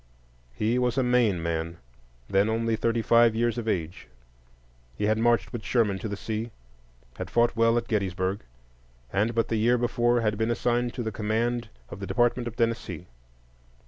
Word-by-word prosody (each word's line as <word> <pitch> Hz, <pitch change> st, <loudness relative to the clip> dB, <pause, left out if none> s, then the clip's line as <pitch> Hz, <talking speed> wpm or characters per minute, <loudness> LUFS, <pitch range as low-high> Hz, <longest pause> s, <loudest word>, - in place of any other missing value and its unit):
He 115 Hz, -, +1 dB
was 125 Hz, 0 st, 0 dB
a 130 Hz, -, +3 dB
Maine 120 Hz, -8 st, +2 dB
man, 85 Hz, 0 st, -2 dB, 0.5 s
then 100 Hz, +2 st, +2 dB
only 115 Hz, 0 st, 0 dB
thirty 115 Hz, +1 st, 0 dB
five 115 Hz, -1 st, +5 dB
years 120 Hz, 0 st, 0 dB
of 115 Hz, -, -6 dB
age. 85 Hz, -5 st, -3 dB, 0.9 s
He -, -, -4 dB
had 110 Hz, +1 st, +2 dB
marched 115 Hz, -3 st, +2 dB
with 120 Hz, -3 st, -5 dB
Sherman 105 Hz, -6 st, +1 dB
to 110 Hz, -, -4 dB
the 100 Hz, -, -4 dB
sea, 110 Hz, +2 st, -4 dB, 0.7 s
had -, -, -5 dB
fought 120 Hz, 0 st, +2 dB
well 115 Hz, +1 st, +3 dB
at 120 Hz, 0 st, -2 dB
Gettysburg, 95 Hz, -2 st, -1 dB, 0.7 s
and 110 Hz, +4 st, +1 dB
but 115 Hz, -, +1 dB
the 115 Hz, -, 0 dB
year 120 Hz, +3 st, +3 dB
before 120 Hz, 0 st, +1 dB
had 105 Hz, -1 st, 0 dB
been 110 Hz, +1 st, +1 dB
assigned 120 Hz, 0 st, 0 dB
to 120 Hz, -, -3 dB
the 110 Hz, -, -3 dB
command 115 Hz, +3 st, -1 dB, 0.2 s
of -, -, -8 dB
the 100 Hz, -, -5 dB
Department 120 Hz, 0 st, +1 dB
of 120 Hz, -, -6 dB
Tennessee. 115 Hz, -8 st, -2 dB
115 Hz, 175 wpm, -26 LUFS, 105-120 Hz, 0.9 s, five